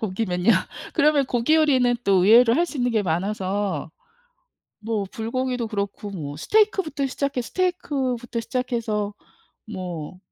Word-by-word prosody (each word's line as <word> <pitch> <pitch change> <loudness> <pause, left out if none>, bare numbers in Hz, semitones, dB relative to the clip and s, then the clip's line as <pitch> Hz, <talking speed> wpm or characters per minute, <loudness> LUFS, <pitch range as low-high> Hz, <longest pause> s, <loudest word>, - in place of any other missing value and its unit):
고기면요? 185 -2 0 0.4
그러면 290 -1 +4
고기 245 +5 +2
요리는 260 -6 +3
또 190 -2 +4
의외로 230 +2 +7
할 345 +5 +2
수 325 - -8
있는 245 -1 +1
게 220 -3 +1
많아서 190 -1 -2 0.9
뭐 215 -2 -2
불고기도 250 +1 -2
그렇고 200 -1 -4
뭐 145 -6 -6
스테이크부터 385 - +1
시작해 275 0 -2
스테이크부터 260 -7 -2
시작해서 230 -4 -2 0.6
뭐, 180 -3 -6
230 Hz, 310 characters per minute, -23 LUFS, 200-260 Hz, 0.9 s, 의외로